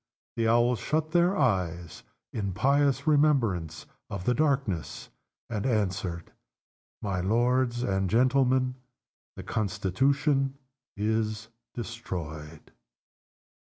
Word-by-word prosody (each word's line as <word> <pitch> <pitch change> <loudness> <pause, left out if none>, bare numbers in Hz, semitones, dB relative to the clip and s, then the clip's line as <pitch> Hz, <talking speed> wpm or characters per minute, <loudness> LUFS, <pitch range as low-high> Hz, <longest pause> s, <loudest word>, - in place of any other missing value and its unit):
the 115 -1 +1
Owls 120 +1 +3
shut 155 +1 -1
their 175 +3 +3
eyes 90 - -1 0.3
in 100 -4 -2
pious 140 +5 +2
remembrance 125 - +2 0.2
of 95 -2 -5
the 125 - +3
darkness, 135 - -1 0.4
and 105 -3 -3
answered, 95 -7 -1 0.7
"My 100 -3 -1
lords 120 +4 +1
and 95 -5 0
gentlemen, 130 +2 +2 0.6
the - - -8
Constitution 135 - 0 0.4
is 110 +1 -1 0.3
destroyed!" 80 -10 -7
115 Hz, 90 wpm, -28 LUFS, 95-135 Hz, 0.7 s, Owls